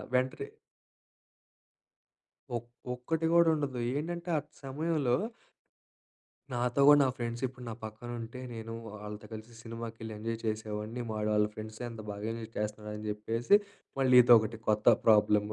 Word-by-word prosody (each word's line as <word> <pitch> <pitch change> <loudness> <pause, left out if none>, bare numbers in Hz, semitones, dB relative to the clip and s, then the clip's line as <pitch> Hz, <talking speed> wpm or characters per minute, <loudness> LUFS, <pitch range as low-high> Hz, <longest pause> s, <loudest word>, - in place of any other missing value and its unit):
వెంటనే 130 +1 0 2.1
ఒక్ 120 +1 -6 0.3
ఒక్కటి 160 +7 -1
గూడా 170 -1 +6
ఉండదు 140 -4 -2 0.2
ఏంటంటే 170 +4 -3
ఆ! - - -1 0.2
సమయంలో 145 -1 0 1.4
నాతో 125 +2 0
గూడా 145 0 +9
నా 135 - +4
ఫ్రెండ్స్ 120 0 -4
ఇప్పుడు 125 -1 -10
నా - - -4
పక్కన 110 +2 -7
ఉంటే 115 +2 -7
నేను 115 0 -6
వాళ్ళతో 105 0 -8
కలిసి 110 +2 -8
సినిమాకెళ్ళి 115 -1 -6
ఎంజాయ్ 115 +1 -3
చేసేవాడిని 110 +2 -3
వాడు 105 0 -1
ఆళ్ళ 105 0 +4
ఫ్రెండ్స్‌తో 110 +1 -7
ఎంత 115 -1 -8
బాగా 100 +1 -6
ఎంజాయ్ 115 -1 -7
చేస్తున్నాడు 105 0 -3
అని 105 0 -6
జెప్పేసి, 115 - +3 0.4
మళ్ళీ 130 -1 +5
ఇదొకటి 115 -2 +5
కొత్త 105 +2 +5
ప్రాబ్లమ్. 105 -1 +4
115 Hz, 135 wpm, -31 LUFS, 110-125 Hz, 2.1 s, గూడా